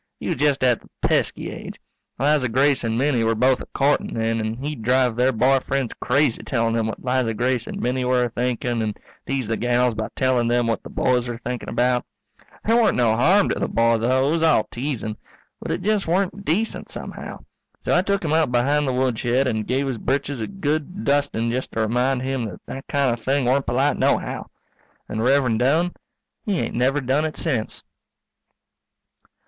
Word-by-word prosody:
He - - -8
was - - -1
just 140 -1 +2
at 125 -3 +3
the - - -20
pesky - - +1
age. - - -8 0.4
Liza 140 -2 +2
Grace 135 +3 +2
and 115 0 -1
Minnie 130 -3 +2
were 115 0 +2
both 130 +3 +2
a - - -8
courtin' 140 +1 0
then, 115 0 0
and 110 +1 -3
he'd 150 -5 -4
drive 125 0 +2
their 125 +2 +3
boy 130 +3 +3
friends 135 -2 -2
crazy 140 -2 +2
telling 115 -2 0
them 115 -1 0
what 110 - -6
Liza 125 -3 +1
Grace 125 0 0
and - - -5
Minnie 125 +1 -1
were 125 0 +2
a 120 - -1
thinking 120 -1 -1
and 105 -2 -2 0.3
tease 135 -4 -1
the 110 0 -1
gals 120 0 +2
by 110 0 -3
telling 130 -3 +2
them 120 0 +2
what 115 -1 -1
the - - -10
boys 125 -1 +1
were 120 -1 -4
thinking 125 +1 -5
about. 125 0 +1 0.6
There 230 +2 +4
weren't 225 - +2
no 115 -3 +3
harm 185 - +4
in - - -1
the - - +1
boy, 115 0 +2
though, 130 +4 +2
it - - +1
was 165 0 +1
all 160 -9 +4
teasing. 120 -4 -3 0.4
But - - -6
it - - -2
just 210 -2 +1
weren't 190 +3 0
decent, 210 +8 -1
somehow. - - -7 0.4
So - - +2
I 175 - +5
tuk 200 -1 -1
him 155 - 0
out 160 -5 +2
behind 140 +4 +2
the 130 - 0
woodshed 125 +1 +1
and 110 -4 -2
give 135 +2 0
his 125 -4 -3
britches 135 0 -1
a - - -2
good 170 0 -3
dusting 140 -5 +1
just 130 +2 -3
to 115 - -1
remind 125 +4 +1
him 130 -2 -2
that 100 -5 -7
that 135 - -8
kind 140 -4 +1
of 115 -1 -7
thing 135 +1 +1
weren't 130 +3 +1
polite 130 +5 +1
nohow. - - 0 0.6
And 110 - -3
Rev'rend 125 -3 +3
Doane, 155 +8 +2 0.5
he 205 -6 -1
ain't - - -2
never 135 +4 +1
done 135 +4 +1
it 155 -1 -3
sence. 130 -10 -2
130 Hz, 205 wpm, -22 LUFS, 115-140 Hz, 0.6 s, I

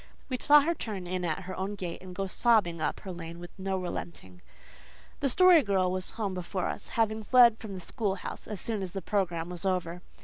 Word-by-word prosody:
We 255 - -1
saw 295 +3 +7
her 330 +4 +1
turn 210 - -5
in 180 0 -3
at 170 +2 -1
her 185 +1 -6
own 195 +2 -3
gate 180 -4 -5
and 185 -1 -10
go 195 +1 -2
sobbing 195 -5 +2
up - - -1
her 190 - -7
lane 170 -1 -7
with 175 0 -9
no 190 0 -1
relenting. 170 - -6 0.8
The 275 - +1
Story 365 +3 +7
Girl 190 -6 +1
was 185 0 -2
home 205 -4 -1
before 180 0 -3
us, - - -6
having 220 -1 +1
fled 235 0 +6
from 205 -3 -7
the 185 - -7
schoolhouse 195 0 -4
as 210 -3 -5
soon 220 0 -2
as 185 -2 -5
the 195 - -4
programme 175 -4 -1
was 175 -1 -4
over. 180 -2 -1
190 Hz, 215 wpm, -29 LUFS, 180-215 Hz, 0.8 s, saw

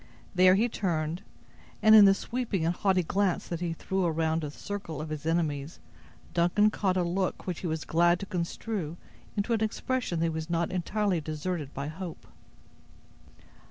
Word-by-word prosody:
There 185 0 +6
he 220 +5 +3
turned, 170 -6 -2 0.6
and, 215 - +6
in 215 -2 +10
the 195 0 +6
sweeping 225 -7 -2
and 170 - +2
haughty 185 -1 +2
glance 190 +2 0
that 170 - -3
he 170 -1 -2
threw 190 +3 -2
around 160 -1 +1
the 150 - -3
circle 165 -1 -6
of 155 0 -5
his 155 0 -5
enemies, 155 -3 -1 0.5
Duncan 180 +5 +3
caught 190 -3 0
a 180 - +2
look 180 +2 -1
which 180 -3 -3
he 180 - -3
was 160 -1 -3
glad 175 +1 +3
to - - -4
construe 175 -2 -3 0.4
into 205 +4 +1
an 225 - 0
expression 220 -2 -1
that 165 - +2
he - - +1
was 160 +1 -4
not 170 0 0
entirely 185 0 0
deserted 155 0 -4
by 140 - -3
hope. 165 +2 -7
175 Hz, 175 wpm, -29 LUFS, 160-195 Hz, 0.6 s, in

